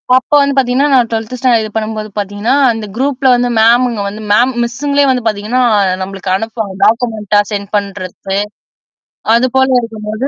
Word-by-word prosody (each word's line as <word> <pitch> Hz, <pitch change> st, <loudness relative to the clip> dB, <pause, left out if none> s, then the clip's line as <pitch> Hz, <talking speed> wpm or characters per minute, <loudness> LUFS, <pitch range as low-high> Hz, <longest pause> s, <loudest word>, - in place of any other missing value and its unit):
அப்ப 260 Hz, +3 st, 0 dB
வந்து 280 Hz, -1 st, +1 dB
பார்த்தீங்கன்னா, 265 Hz, +2 st, +2 dB
நான் 245 Hz, -3 st, +4 dB
12 225 Hz, +2 st, -3 dB
ஸ்டாண்டர்ட் 245 Hz, -3 st, +2 dB
இது 215 Hz, -, -5 dB
பண்ணும்போது 215 Hz, -1 st, -3 dB
பார்த்தீங்கன்னா, 205 Hz, +5 st, -1 dB, 0.2 s
அந்த 225 Hz, -1 st, -5 dB
குரூப்ல 270 Hz, +1 st, 0 dB
வந்து 245 Hz, 0 st, 0 dB
மேமுங்க 235 Hz, -1 st, +3 dB
வந்து 210 Hz, +2 st, -7 dB
மேம் 245 Hz, +5 st, +3 dB
மிஸ்ஸுங்களே 280 Hz, +4 st, 0 dB
வந்து 250 Hz, -2 st, -1 dB
பார்த்தீங்கன்னா 215 Hz, +4 st, -1 dB, 0.4 s
நம்மளுக்கு 190 Hz, 0 st, -5 dB
அனுப்புவாங்க. 220 Hz, -1 st, -4 dB
டாக்குமெண்டா 220 Hz, -2 st, +1 dB
சென்ட் 200 Hz, -1 st, -4 dB
பண்றது. 195 Hz, -1 st, -5 dB, 1.0 s
அது 250 Hz, +2 st, +2 dB
போல 265 Hz, 0 st, +3 dB
இருக்கும்போது 220 Hz, +1 st, -4 dB
225 Hz, 150 wpm, -13 LUFS, 210-255 Hz, 1.0 s, நான்